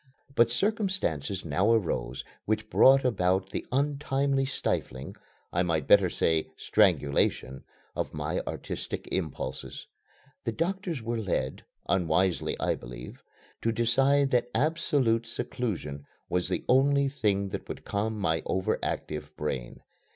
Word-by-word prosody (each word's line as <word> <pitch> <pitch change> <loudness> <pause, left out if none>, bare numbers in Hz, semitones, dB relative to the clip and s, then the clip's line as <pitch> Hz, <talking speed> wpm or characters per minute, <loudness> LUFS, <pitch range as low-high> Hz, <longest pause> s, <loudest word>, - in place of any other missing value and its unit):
But 120 -3 +5
circumstances 185 - -1
now 90 +8 +2
arose 80 - -1 0.2
which 110 +1 -1
brought 135 0 +6
about 95 -4 +1
the - - -4
untimely 140 0 +1
stifling 65 - -3 0.4
I 90 - +2
might 80 -5 0
better - - +6
say 80 -1 +1
strangulation 70 -8 +2 0.3
of - - -2
my - - -2
artistic - - -5
impulses. 75 -7 -4 0.6
The - - -2
doctors 175 - -2
were 115 0 -2
led 90 -10 -2 0.2
unwisely, 90 -2 +1
I - - +1
believe - - -9 0.4
to 115 - +1
decide 135 +5 +3
that 120 -1 +2
absolute 135 -5 +2
seclusion 90 - -4 0.2
was 90 0 0
the 90 - -2
only 140 +2 +4
thing 105 -8 0
that - - -6
would - - -7
calm 110 +2 -1
my 80 -5 +1
over 95 0 0
active 75 -1 -3
brain. 65 -5 -4
110 Hz, 125 wpm, -28 LUFS, 80-135 Hz, 0.6 s, brought